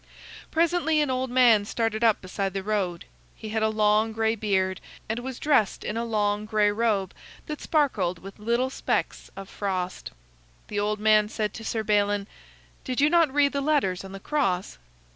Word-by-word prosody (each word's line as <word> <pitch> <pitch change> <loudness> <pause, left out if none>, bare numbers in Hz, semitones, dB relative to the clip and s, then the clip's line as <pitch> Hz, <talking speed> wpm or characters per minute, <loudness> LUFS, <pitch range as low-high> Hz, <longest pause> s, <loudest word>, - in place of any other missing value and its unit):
Presently 325 -1 +2
an 295 -3 +1
old 255 0 -1
man 240 -4 +5
started 225 +1 -2
up 225 -2 +3
beside 190 +1 -3
the 195 -1 -3
road. 190 -5 -2 0.3
He 220 - -8
had 220 +1 -1
a 220 - +2
long 215 +1 +2
gray 220 0 +1
beard, 190 -4 -1 0.3
and 220 +2 -2
was 255 0 -6
dressed 285 -9 +1
in 210 - -3
a 230 - -1
long 210 -2 0
gray 215 -1 +2
robe 205 -4 0 0.3
that 300 -1 -6
sparkled 215 - +1
with 195 +4 -12
little 235 +4 0
specks - - -2
of 195 -1 -8
frost. 185 -3 -4 0.6
The 205 - -2
old 210 +1 -1
man 215 0 +4
said 215 -2 -2
to 225 - -8
Sir 220 0 -2
Balin: 205 -1 +1 0.6
"Did 255 0 -3
you 295 +2 +4
not 335 -5 +4
read 285 0 +2
the 280 - -1
letters 275 -12 +1
on 190 - -9
the 195 - -8
cross?" 195 - -1
215 Hz, 180 wpm, -26 LUFS, 200-255 Hz, 0.6 s, man